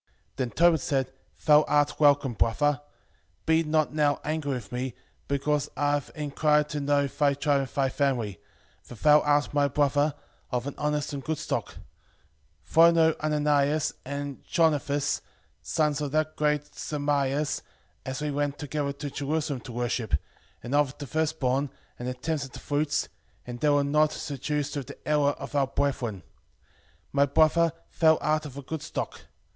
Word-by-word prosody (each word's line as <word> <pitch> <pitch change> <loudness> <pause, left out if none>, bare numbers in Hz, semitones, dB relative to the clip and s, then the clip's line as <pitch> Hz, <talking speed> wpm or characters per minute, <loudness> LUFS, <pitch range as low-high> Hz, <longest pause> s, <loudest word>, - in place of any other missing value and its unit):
5:13 - - -67 0.3
Then 125 -2 -1
Tobit 170 +3 +4
said, 135 -2 -1 0.3
Thou 150 -1 +7
art 145 -1 +2
welcome, 145 -3 +4
brother; 145 +6 +1 0.6
be 160 0 +4
not 155 -1 +1
now 150 -2 +2
angry 150 -2 -2
with 120 -5 -6
me, 125 0 -3 0.3
because 145 +1 0
I 145 0 +2
have 145 -2 -1
enquired 150 0 +1
to 150 - -3
know 145 0 +2
thy 140 +1 +1
tribe 145 0 +2
and 135 - -2
thy 135 -1 +1
family; 125 - -1 0.4
for - - -12
thou 150 +6 +6
art 145 0 +2
my 145 -1 +3
brother, 145 +1 +1 0.4
of 125 -1 -1
an 140 - -4
honest 150 0 -1
and 140 -1 -5
good 160 0 -2
stock: - - -3 0.9
for 165 +1 +5
I - - +7
know 160 -1 +4
Ananias 150 0 +1
and 140 0 -5
Jonathas, 145 -3 +1 0.4
sons 150 -2 0
of 145 -2 -2
that 155 0 0
great 150 -1 +1
Samaias, 145 -1 -1 0.4
as 130 +3 -4
we 150 - -1
went 145 0 -1
together 145 0 -3
to 145 0 -6
Jerusalem 145 -1 -2
to 120 - -10
worship, 120 -5 -1 0.5
and 120 - -5
offered 145 -2 +2
the 145 - -6
firstborn, 145 -2 0 0.3
and 120 - -4
the 125 - -3
tenths 150 +3 -2
of 135 - -13
the - - -8
fruits; 145 0 0 0.4
and 120 0 -7
they 150 - +2
were 145 -1 +4
not 150 +2 +3
seduced 145 0 -3
with 140 -4 -4
the - - -12
error 145 -1 +3
of - - -9
our 140 -2 +2
brethren: 130 -8 -2 0.9
my 140 0 +3
brother, 160 +3 +4 0.3
thou 160 -1 +6
art 155 0 0
of 140 -1 -11
a 140 - -6
good 160 +3 -5
stock. - - -5
145 Hz, 170 wpm, -27 LUFS, 140-150 Hz, 0.9 s, Thou